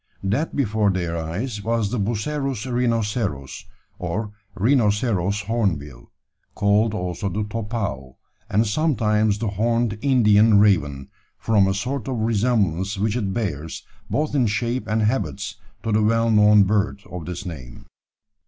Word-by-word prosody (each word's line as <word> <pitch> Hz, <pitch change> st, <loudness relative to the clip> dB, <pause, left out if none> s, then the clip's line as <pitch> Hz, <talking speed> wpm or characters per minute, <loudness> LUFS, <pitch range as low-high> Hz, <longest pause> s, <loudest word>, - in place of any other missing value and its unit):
That 110 Hz, +12 st, -1 dB
before 110 Hz, -6 st, +1 dB
their 85 Hz, -3 st, -1 dB
eyes 100 Hz, +7 st, -4 dB
was 115 Hz, -2 st, 0 dB
the 125 Hz, -, -1 dB
Bucerus 125 Hz, +3 st, -2 dB
rhinoceros, 115 Hz, -, -1 dB, 0.3 s
or 105 Hz, +5 st, -3 dB, 0.2 s
"rhinoceros 105 Hz, -3 st, +1 dB
hornbill," 80 Hz, -, -2 dB, 0.4 s
called 105 Hz, +1 st, +2 dB
also 90 Hz, +1 st, -3 dB
the 105 Hz, +3 st, -2 dB
"topau," 105 Hz, -, -4 dB, 0.3 s
and 110 Hz, +3 st, +2 dB
sometimes 110 Hz, -5 st, +1 dB
the 110 Hz, 0 st, -2 dB
"horned 115 Hz, +1 st, 0 dB
Indian 110 Hz, -5 st, +5 dB
raven," 75 Hz, -10 st, +2 dB, 0.3 s
from 105 Hz, -4 st, +3 dB
a 95 Hz, -, 0 dB
sort 130 Hz, +7 st, -3 dB
of 130 Hz, -2 st, -2 dB
resemblance 105 Hz, -4 st, +1 dB
which 105 Hz, +2 st, 0 dB
it 105 Hz, -6 st, -1 dB
bears 80 Hz, -8 st, -4 dB, 0.2 s
both 150 Hz, 0 st, -1 dB
in 130 Hz, -5 st, +2 dB
shape 120 Hz, +4 st, -1 dB
and 110 Hz, 0 st, +1 dB
habits 105 Hz, -4 st, -1 dB, 0.3 s
to 115 Hz, -, -1 dB
the 105 Hz, +1 st, +3 dB
well 115 Hz, +2 st, +2 dB
known 105 Hz, -1 st, +6 dB
bird 100 Hz, +1 st, 0 dB
of 90 Hz, -3 st, -6 dB
this 90 Hz, +2 st, -5 dB
name. 65 Hz, -9 st, -9 dB
105 Hz, 135 wpm, -22 LUFS, 95-115 Hz, 0.4 s, known